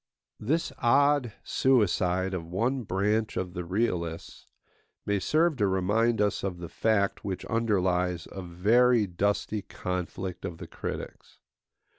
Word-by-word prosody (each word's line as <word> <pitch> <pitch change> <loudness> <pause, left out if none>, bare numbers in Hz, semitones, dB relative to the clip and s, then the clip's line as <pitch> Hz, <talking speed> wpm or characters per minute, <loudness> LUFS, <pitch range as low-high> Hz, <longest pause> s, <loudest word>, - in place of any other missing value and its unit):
This 155 +10 -1
odd 140 0 +3
suicide 95 -7 +2
of 85 -3 -4
one 120 +10 0
branch 105 +2 0
of 90 -1 -3
the 90 -1 -4
realists 85 -3 -2 0.6
may 100 -1 +1
serve 155 - +2
to 105 - +2
remind 105 +5 +1
us 105 -1 +1
of 95 -3 -2
the 85 -1 -7
fact 100 +1 +1
which 95 -2 -4
underlies 90 -6 0
a 95 - -6
very 110 +7 +3
dusty 100 +3 -1
conflict 90 -1 -5
of 90 -4 -5
the - - -8
critics. - - -7
100 Hz, 130 wpm, -28 LUFS, 90-115 Hz, 0.6 s, odd